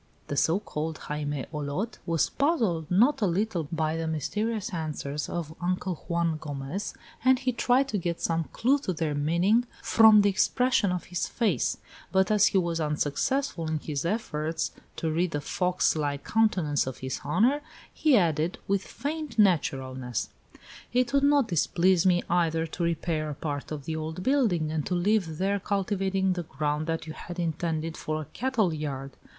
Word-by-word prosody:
The 145 - -2
so 165 +6 +3
called 160 -5 -4
Jaime 145 -2 -3
Olot 150 +10 -3
was 165 -1 +2
puzzled 225 - +1
not 230 +11 +4
a 205 - +3
little 180 -3 -1
by 160 -1 0
the 165 0 -2
mysterious 210 - -2
answers 150 -3 -3
of 160 -3 -4
Uncle 180 +1 -1
Juan 170 -2 0
Gomez, 145 +6 -5 0.3
and 260 0 +5
he 255 +1 0
tried 250 +3 +2
to 210 - -1
get 170 -1 -2
some 165 -1 0
clue 270 - +1
to 190 -9 -2
their 160 -2 -1
meaning 170 +11 +2 0.2
from 220 -2 +7
the 205 - +4
expression 235 0 +2
of 180 -1 -2
his 180 0 -3
face; 205 - 0 0.3
but 190 +1 +3
as 210 0 +5
he 195 - +2
was 170 -2 0
unsuccessful 160 - -1
in 155 0 0
his 145 -2 -3
efforts 165 -5 -2 0.2
to 160 - -2
read 175 +3 +1
the 145 - -2
fox 180 +5 +1
like 145 -2 -2
countenance 180 -11 +2
of 130 - -4
his 130 - -3
honor, 265 +7 +2 0.3
he 300 -5 +4
added, 165 -2 +1
with 195 -1 +1
feigned 295 -4 -5
naturalness: 130 - +1 0.6
"It 250 +1 +1
would 280 - +4
not 285 -3 +4
displease 180 +1 +3
me, 175 -1 +3
either, 165 -2 +1
to 165 +2 -4
repair 165 -2 -1
a 145 - -4
part 145 0 -4
of 145 -3 -5
the 160 - -3
old 160 +3 -5
building 205 - +2
and 155 -1 -1
to 180 - 0
live 175 -3 +1
there, 200 +3 +1
cultivating 195 -1 0
the 180 - -3
ground 150 0 -2
that 165 -1 -2
you 155 - -6
had 175 +2 -8
intended 165 -1 -2
for 155 0 -3
a 155 - -5
cattle 225 -8 +1
yard. 140 -3 -4
170 Hz, 175 wpm, -27 LUFS, 155-210 Hz, 0.6 s, from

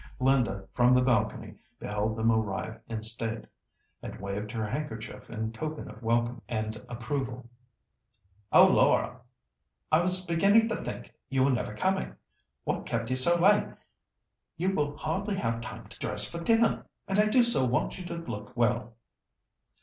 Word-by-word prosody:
Linda, 125 -7 +2
from 125 0 +5
the 125 0 +5
balcony, 125 -3 0 0.2
beheld 105 +1 -2
them 115 +1 +2
arrive 110 0 -1
in 110 -1 -4
state, 110 0 -3 0.6
and - - -7
waved 100 +2 -4
her 110 -1 -2
handkerchief 115 -2 -5
in 110 -1 -3
token 155 +6 -5
of 110 - -11
welcome 120 +1 0
and 110 -1 -2
approval. 120 +1 -4 1.0
"Oh! - - +9
Laura, 125 - +3 0.7
I 155 +2 +5
was 185 +1 -1
beginning 200 +7 +4
to 220 - 0
think - - -7 0.2
you 135 -1 +2
were 140 - +4
never 120 -4 -2
coming. 190 - 0 0.5
What - - -2
kept 115 +1 -2
you - - +2
so 170 +7 +4
late? 205 +4 +5 0.9
You 185 +3 0
will 145 -4 -1
hardly 195 +6 -2
have 115 -8 -1
time 115 -2 -8
to - - -14
dress 105 0 -1
for 170 - -6
dinner, 225 +6 +2 0.2
and 195 +1 +1
I 210 - +5
do 245 +3 +5
so 235 - +2
want 125 +8 0
you 180 - -7
to 175 - -5
look 125 -8 -7
well." 120 -1 +1
125 Hz, 160 wpm, -29 LUFS, 110-170 Hz, 1.0 s, Oh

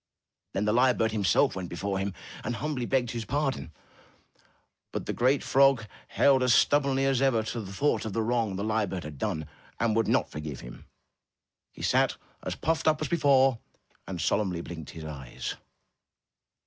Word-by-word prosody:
Then 100 +2 0
the 105 - +2
lyre 125 +1 +4
bird 110 0 +1
himself 100 -5 +2
went 95 -2 -5
before 95 +3 -2
him 95 -1 -3 0.3
and 120 - -2
humbly 135 -3 -3
begged 125 -3 +1
his 115 -2 -3
pardon. 135 - -2 1.2
But - - -4
the 130 +3 +2
frog 135 -4 +4 0.2
held 135 -2 +4
as 125 -2 +4
stubbornly 140 -2 +3
as 135 -2 +2
ever 125 -5 +3
to 115 +1 -4
the 95 -2 -8
thought 140 +10 +1
of 110 - -4
the 115 - 0
wrong 115 -3 0
the 100 - -3
lyre 110 -1 +1
bird 90 -1 -4
had 75 -2 -8
done, 80 -1 -2 0.3
and 115 -2 +1
would 115 -1 +2
not - - +1
forgive 75 -2 -6
him. - - -11 0.8
He - - -10
sat - - +2 0.2
as - - -4
puffed 160 0 -1
up 155 -1 +4
as 155 - -3
be 170 - +1
fore, 135 -5 +4 0.5
and 95 -2 -5
solemnly 90 0 0
blinked 80 -3 -8
his 80 -1 -8
eyes. 70 -5 -6
115 Hz, 180 wpm, -28 LUFS, 95-135 Hz, 1.2 s, lyre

